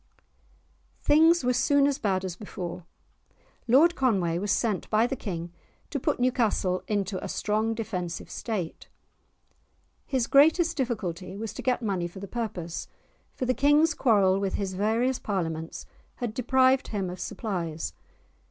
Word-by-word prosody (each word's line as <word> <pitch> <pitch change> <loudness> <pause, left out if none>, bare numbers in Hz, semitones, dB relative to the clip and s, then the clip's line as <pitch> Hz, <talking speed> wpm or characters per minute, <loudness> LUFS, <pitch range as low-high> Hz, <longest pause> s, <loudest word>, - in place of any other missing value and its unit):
Things 320 +2 +5
were 250 0 +2
soon 280 +3 +3
as 280 -1 0
bad 190 -3 0
as 180 -2 -4
before. 180 -3 -7 0.8
Lord 295 +9 +6
Conway 190 - +1
was 205 +1 -1
sent 215 -4 0
by 220 +2 +3
the 270 - -2
King 175 -7 -5 0.4
to 285 - -1
put - - -1
Newcastle 225 -7 +1
into 200 -2 -2
a - - -4
strong 220 +2 0
defensive 185 -7 -4
state. 195 -8 -5 1.2
His 260 -4 +1
greatest 320 +6 +4
difficulty 190 - -3
was 220 0 -5
to - - -6
get 250 -2 0
money 190 -5 -1
for 175 - -13
the 200 - -7
purpose, 185 -7 -4 0.5
for 255 - -2
the 255 - +2
King's 295 +5 +4
quarrel 195 -6 +3
with 195 -1 -1
his 195 -2 -2
various 225 +6 +1
Parliaments 165 -5 -3 0.3
had 240 -4 -4
deprived 260 +2 +3
him 200 -4 -2
of 180 +1 -6
supplies. 170 -7 -4
215 Hz, 145 wpm, -27 LUFS, 185-255 Hz, 1.2 s, Lord